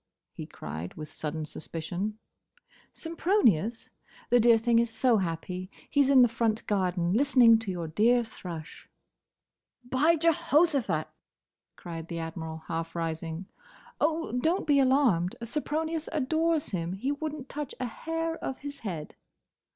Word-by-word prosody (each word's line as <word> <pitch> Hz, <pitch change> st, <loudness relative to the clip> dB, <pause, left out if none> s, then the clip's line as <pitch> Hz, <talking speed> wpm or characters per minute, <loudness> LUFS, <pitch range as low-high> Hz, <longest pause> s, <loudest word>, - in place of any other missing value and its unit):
he -, -, -7 dB
cried, 80 Hz, +4 st, -7 dB
with 155 Hz, -1 st, -7 dB
sudden 155 Hz, +1 st, -4 dB
suspicion. 175 Hz, +7 st, -5 dB, 0.7 s
"Sempronius? 325 Hz, -, +1 dB, 0.4 s
The 245 Hz, -, +6 dB
dear 230 Hz, 0 st, +6 dB
thing 230 Hz, +1 st, +3 dB
is 235 Hz, 0 st, +1 dB
so 230 Hz, +1 st, +3 dB
happy. 180 Hz, 0 st, -3 dB, 0.2 s
He 285 Hz, -, +4 dB
's 275 Hz, -, +3 dB
in 265 Hz, -2 st, +7 dB
the -, -, +6 dB
front 230 Hz, -1 st, -1 dB
garden, 180 Hz, -3 st, 0 dB
listening 245 Hz, -2 st, +6 dB
to 225 Hz, -3 st, -5 dB
your 175 Hz, -3 st, -3 dB
dear 235 Hz, +9 st, +3 dB
thrush." 170 Hz, -8 st, -9 dB, 0.9 s
"By 270 Hz, +7 st, +3 dB
Jehoshaphat!" 300 Hz, -, +2 dB, 0.7 s
cried 165 Hz, -1 st, -7 dB
the 170 Hz, -, -5 dB
Admiral, 160 Hz, -1 st, -5 dB
half 165 Hz, 0 st, -4 dB
rising. 165 Hz, +1 st, -3 dB, 0.5 s
"Oh, 320 Hz, +2 st, 0 dB
don't 320 Hz, +10 st, 0 dB
be 290 Hz, -3 st, +4 dB
alarmed! 255 Hz, -10 st, +3 dB
Sempronius 310 Hz, +5 st, -2 dB
adores 315 Hz, +2 st, +1 dB
him. 175 Hz, -2 st, -2 dB
He 240 Hz, +9 st, -2 dB
would 295 Hz, +1 st, -3 dB
n't 275 Hz, -3 st, -9 dB
touch 295 Hz, -1 st, -5 dB
a 255 Hz, -, -1 dB
hair 325 Hz, +6 st, -3 dB
of 265 Hz, -, -3 dB
his 285 Hz, 0 st, -8 dB
head." 170 Hz, -8 st, -5 dB
230 Hz, 140 wpm, -28 LUFS, -, 0.9 s, in